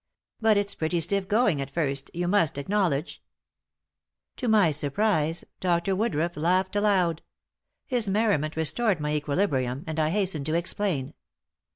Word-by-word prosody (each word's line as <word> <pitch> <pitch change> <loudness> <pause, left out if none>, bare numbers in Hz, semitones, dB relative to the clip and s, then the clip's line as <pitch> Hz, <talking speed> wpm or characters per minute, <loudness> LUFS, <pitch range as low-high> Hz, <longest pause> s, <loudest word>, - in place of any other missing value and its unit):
But 220 -2 +4
it's 205 0 0
pretty 160 +2 -1
stiff 190 +4 0
going 205 - +2
at 135 - -5
first, 140 -2 -2
you 175 +1 -2
must 175 -7 +2
acknowledge." 165 -1 -1 1.2
To 250 - -3
my 210 -7 +4
surprise, 160 +2 0
Dr. 180 +1 +1
Woodruff 175 -5 -1
laughed 185 +5 +1
aloud. 190 -6 +2 0.6
His 240 -6 -1
merriment 195 -7 +1
restored 180 +5 +1
my 150 0 -2
equilibrium, 145 -3 -1
and 160 0 -4
I 155 0 +2
hastened 180 -6 -1
to 155 - 0
explain. 170 -5 -2
175 Hz, 140 wpm, -26 LUFS, 150-205 Hz, 1.2 s, But